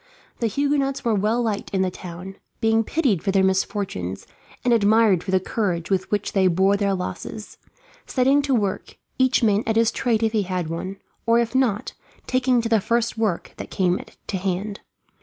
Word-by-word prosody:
The 230 Hz, -, +1 dB
Huguenots 275 Hz, +2 st, 0 dB
were 230 Hz, -, +2 dB
well 215 Hz, +4 st, +1 dB
liked 215 Hz, -3 st, -2 dB
in 190 Hz, -2 st, 0 dB
the 185 Hz, -, -1 dB
town, 180 Hz, +2 st, -9 dB, 0.2 s
being 225 Hz, 0 st, +3 dB
pitied 245 Hz, -, +1 dB
for -, -, -2 dB
their 195 Hz, 0 st, +3 dB
misfortunes, 190 Hz, -, -1 dB, 0.4 s
and 245 Hz, -, +4 dB
admired 215 Hz, -4 st, +4 dB
for -, -, -8 dB
the 190 Hz, 0 st, +3 dB
courage 185 Hz, -3 st, -2 dB
with 190 Hz, -1 st, 0 dB
which 205 Hz, -1 st, -1 dB
they 190 Hz, -2 st, +4 dB
bore 190 Hz, +3 st, +3 dB
their 200 Hz, -1 st, +1 dB
losses; 210 Hz, +3 st, -6 dB, 0.5 s
setting 270 Hz, +2 st, +3 dB
to 280 Hz, -2 st, +1 dB
work, 200 Hz, -4 st, -2 dB, 0.2 s
each 260 Hz, -1 st, +3 dB
man 210 Hz, -2 st, +3 dB
at 225 Hz, -, +1 dB
his 225 Hz, 0 st, +3 dB
trade 230 Hz, -3 st, 0 dB
if 220 Hz, -, +2 dB
he 215 Hz, -1 st, +1 dB
had 180 Hz, -4 st, -3 dB
one, 185 Hz, +4 st, -5 dB, 0.3 s
or 230 Hz, 0 st, +5 dB
if 235 Hz, 0 st, 0 dB
not, 250 Hz, -6 st, +1 dB, 0.3 s
taking 255 Hz, -1 st, +2 dB
to 230 Hz, -, -2 dB
the 225 Hz, -2 st, +3 dB
first 235 Hz, +2 st, 0 dB
work 215 Hz, -6 st, -2 dB
that -, -, -7 dB
came 180 Hz, -1 st, 0 dB, 0.2 s
to 195 Hz, -, -3 dB
hand. 195 Hz, +2 st, -3 dB
210 Hz, 190 wpm, -23 LUFS, 190-230 Hz, 0.5 s, or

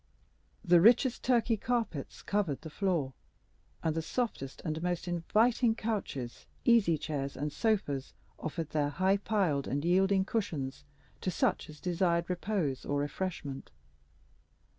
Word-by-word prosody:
The 175 Hz, -1 st, +6 dB
richest 240 Hz, +4 st, +5 dB
Turkey 235 Hz, -2 st, +3 dB
carpets 225 Hz, -, -2 dB
covered 195 Hz, -9 st, 0 dB
the 160 Hz, -, -8 dB
floor, 165 Hz, -8 st, 0 dB, 0.7 s
and 160 Hz, -2 st, +1 dB
the 165 Hz, -, -1 dB
softest 160 Hz, -, -3 dB
and 155 Hz, 0 st, -2 dB
most 175 Hz, 0 st, -2 dB
inviting 220 Hz, +7 st, +2 dB
couches, 195 Hz, -, -4 dB, 0.2 s
easy 220 Hz, -9 st, +5 dB
chairs, 140 Hz, -2 st, -3 dB
and 145 Hz, +1 st, -3 dB
sofas, 190 Hz, -, 0 dB, 0.2 s
offered 160 Hz, 0 st, -4 dB
their 145 Hz, -2 st, +1 dB
high 190 Hz, +6 st, +2 dB
piled 190 Hz, -9 st, 0 dB
and 145 Hz, +4 st, -1 dB
yielding 190 Hz, +2 st, +3 dB
cushions 145 Hz, -11 st, -3 dB, 0.4 s
to -, -, -1 dB
such 175 Hz, -, 0 dB
as 150 Hz, -1 st, -11 dB
desired 170 Hz, 0 st, +1 dB
repose 175 Hz, -7 st, -1 dB
or 145 Hz, -, -1 dB
refreshment. 145 Hz, -2 st, -4 dB
175 Hz, 130 wpm, -31 LUFS, 145-205 Hz, 0.7 s, The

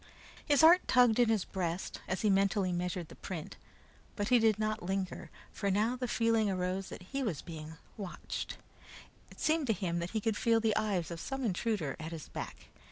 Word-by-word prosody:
His 290 Hz, -2 st, +4 dB
heart 335 Hz, +3 st, +8 dB
tugged 245 Hz, -3 st, +5 dB
in 240 Hz, -2 st, +5 dB
his 220 Hz, -4 st, +2 dB
breast 180 Hz, -1 st, -3 dB
as 185 Hz, -, -1 dB
he 215 Hz, -, +3 dB
mentally 195 Hz, -1 st, +2 dB
measured 175 Hz, -1 st, -2 dB
the -, -, -11 dB
print, 170 Hz, -5 st, -6 dB, 0.6 s
but 205 Hz, 0 st, -1 dB
he 250 Hz, -1 st, +6 dB
did 220 Hz, -2 st, +4 dB
not 215 Hz, 0 st, -1 dB
linger, 185 Hz, -2 st, -3 dB, 0.2 s
for 200 Hz, -, -2 dB
now 215 Hz, +5 st, +2 dB
the 250 Hz, 0 st, -3 dB
feeling 230 Hz, -3 st, +2 dB
arose 185 Hz, 0 st, -2 dB
that -, -, -8 dB
he 275 Hz, -, 0 dB
was 200 Hz, -, -2 dB
being 160 Hz, -1 st, -8 dB, 0.2 s
watched. 195 Hz, -4 st, -5 dB, 0.7 s
It -, -, -15 dB
seemed 315 Hz, -2 st, +2 dB
to 225 Hz, -, +3 dB
him 175 Hz, -3 st, -2 dB
that 170 Hz, +1 st, -3 dB
he 220 Hz, -, -1 dB
could 215 Hz, 0 st, 0 dB
feel 230 Hz, -1 st, +3 dB
the 220 Hz, -2 st, +1 dB
eyes 195 Hz, -6 st, 0 dB
of 170 Hz, -, -5 dB
some 270 Hz, +8 st, -4 dB
intruder 200 Hz, -6 st, -1 dB
at 160 Hz, +1 st, -6 dB
his 160 Hz, -3 st, -8 dB
back. -, -, -7 dB
200 Hz, 200 wpm, -32 LUFS, 180-225 Hz, 0.7 s, heart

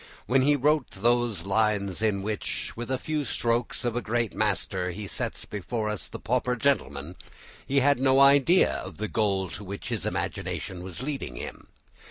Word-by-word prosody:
When 130 Hz, +2 st, +3 dB
he 145 Hz, +2 st, +4 dB
wrote 145 Hz, 0 st, +2 dB
those 120 Hz, -1 st, +2 dB
lines 100 Hz, -1 st, +1 dB
in 105 Hz, -3 st, +1 dB
which 105 Hz, 0 st, -3 dB
"with 120 Hz, +2 st, -5 dB
a 130 Hz, -, +1 dB
few 150 Hz, +2 st, -2 dB
strokes 120 Hz, -1 st, 0 dB
of 120 Hz, -1 st, 0 dB
a 120 Hz, -, 0 dB
great 115 Hz, -1 st, -1 dB
master 90 Hz, -1 st, 0 dB
he 100 Hz, +4 st, -5 dB
sets -, -, -4 dB
before 105 Hz, +2 st, -3 dB
us 105 Hz, -2 st, -4 dB
the -, -, -6 dB
pauper 125 Hz, +4 st, 0 dB
gentleman," 90 Hz, -, 0 dB, 0.5 s
he 140 Hz, 0 st, +3 dB
had 140 Hz, 0 st, +4 dB
no 135 Hz, 0 st, +4 dB
idea 140 Hz, +6 st, +6 dB
of -, -, -8 dB
the 110 Hz, -, -2 dB
goal 100 Hz, -5 st, +1 dB
to 105 Hz, -, -7 dB
which 100 Hz, +1 st, -6 dB
his -, -, -1 dB
imagination 90 Hz, -2 st, -3 dB
was 95 Hz, +6 st, -6 dB
leading 135 Hz, -, -4 dB
him. -, -, -8 dB
115 Hz, 180 wpm, -27 LUFS, 100-130 Hz, 0.5 s, idea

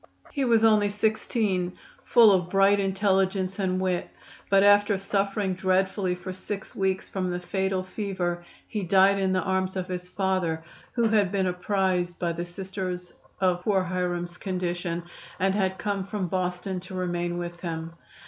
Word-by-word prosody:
He 280 Hz, -, -1 dB
was 230 Hz, -2 st, +4 dB
only 215 Hz, -2 st, +5 dB
16, 205 Hz, -3 st, 0 dB, 0.3 s
full 230 Hz, -4 st, +7 dB
of 180 Hz, -2 st, +2 dB
bright 195 Hz, +1 st, +4 dB
intelligence 195 Hz, -1 st, +1 dB
and 185 Hz, -1 st, 0 dB
wit, 185 Hz, -1 st, -1 dB, 0.4 s
but 195 Hz, 0 st, +5 dB
after 205 Hz, 0 st, +5 dB
suffering 195 Hz, 0 st, 0 dB
dreadfully 185 Hz, 0 st, +1 dB
for 185 Hz, +1 st, -7 dB
six 195 Hz, +2 st, -6 dB
weeks 190 Hz, -1 st, 0 dB
from 185 Hz, -2 st, -2 dB
the 175 Hz, 0 st, -2 dB
fatal 190 Hz, +1 st, -1 dB
fever 185 Hz, -3 st, -3 dB, 0.2 s
he 215 Hz, -, -3 dB
died 195 Hz, +2 st, +4 dB
in 190 Hz, -1 st, +1 dB
the 185 Hz, -1 st, +1 dB
arms 190 Hz, 0 st, 0 dB
of 185 Hz, -1 st, -2 dB
his 180 Hz, 0 st, -3 dB
father, 180 Hz, -4 st, -1 dB, 0.3 s
who 235 Hz, -, +1 dB
had 205 Hz, -4 st, +3 dB
been 195 Hz, -2 st, +1 dB
apprised 180 Hz, -1 st, 0 dB
by 170 Hz, -1 st, -1 dB
the 170 Hz, +1 st, -4 dB
Sisters 185 Hz, -1 st, -5 dB, 0.3 s
of 180 Hz, -2 st, +2 dB
poor 190 Hz, -1 st, +2 dB
Hiram's 175 Hz, -1 st, -2 dB
condition, 175 Hz, -2 st, -3 dB, 0.4 s
and 190 Hz, 0 st, +2 dB
had 190 Hz, -2 st, 0 dB
come 200 Hz, -2 st, -2 dB
from 195 Hz, -2 st, -3 dB
Boston 180 Hz, +1 st, -2 dB
to 185 Hz, +1 st, -9 dB
remain 175 Hz, -1 st, -2 dB
with 175 Hz, 0 st, -5 dB
him. 165 Hz, -1 st, -5 dB
190 Hz, 160 wpm, -26 LUFS, 180-195 Hz, 0.4 s, full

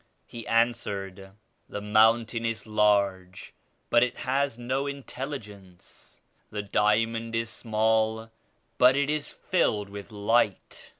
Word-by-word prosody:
He 115 Hz, -1 st, -9 dB
answered. 100 Hz, -5 st, -1 dB, 0.4 s
"The -, -, -5 dB
mountain 110 Hz, +2 st, +3 dB
is 115 Hz, -1 st, -3 dB
large 100 Hz, -4 st, 0 dB, 0.4 s
but 120 Hz, -, +5 dB
it 125 Hz, 0 st, 0 dB
has 135 Hz, -1 st, -1 dB
no 130 Hz, +3 st, -2 dB
intelligence. 125 Hz, -9 st, -9 dB, 0.3 s
The 105 Hz, -1 st, -4 dB
diamond 115 Hz, +3 st, +1 dB
is 115 Hz, 0 st, -2 dB
small 110 Hz, 0 st, 0 dB, 0.5 s
but 125 Hz, +1 st, +6 dB
it 145 Hz, +1 st, +1 dB
is 150 Hz, -1 st, -2 dB
filled 105 Hz, -, 0 dB
with 100 Hz, +1 st, -9 dB
light. 105 Hz, -1 st, 0 dB
110 Hz, 115 wpm, -27 LUFS, 105-120 Hz, 0.5 s, but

